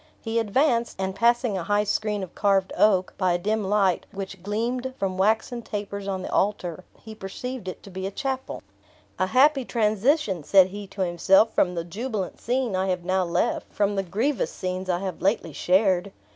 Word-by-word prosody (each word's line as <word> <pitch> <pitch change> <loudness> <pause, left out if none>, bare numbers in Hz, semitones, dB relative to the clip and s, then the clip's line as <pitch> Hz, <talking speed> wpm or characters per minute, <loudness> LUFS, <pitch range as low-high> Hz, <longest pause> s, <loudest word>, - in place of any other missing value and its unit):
He 225 0 -1
advanced, 235 0 +1
and 190 0 -1
passing 235 +1 +2
a - - -4
high 205 +3 +2
screen 210 -1 -1
of 185 - -8
carved 195 -2 +1
oak, 190 -3 +3
by 185 -2 +2
a - - +2
dim 210 +4 -1
light, 195 -2 +1
which 195 -1 -7
gleamed 240 +6 -2
from 190 -1 -2
waxen 220 +5 +1
tapers 200 -2 -5
on 190 -2 -2
the - - -5
altar, 185 -3 -1
he 220 - -11
perceived 215 +3 -6
it 185 - -6
to 200 - -12
be 190 +1 -6
the 190 - -2
chapel. 265 +5 -4 0.6
"A 185 - +2
happy 270 +6 +4
transition," 220 - +1
said 190 +3 +5
he 200 +1 -7
to 195 - -7
himself, 190 +5 +4
"from 180 -1 +2
the 170 - -2
jubilant 205 +2 -4
scene 245 -3 0
I 190 +1 0
have 180 -2 -1
now 185 +1 +1
left; 170 -1 -1
from 205 0 0
the 195 - +1
grievous 220 - -1
scenes 185 0 -4
I 175 0 0
have 190 -3 -5
lately 195 -5 0
shared! 185 +2 +2
200 Hz, 190 wpm, -25 LUFS, 185-225 Hz, 0.6 s, said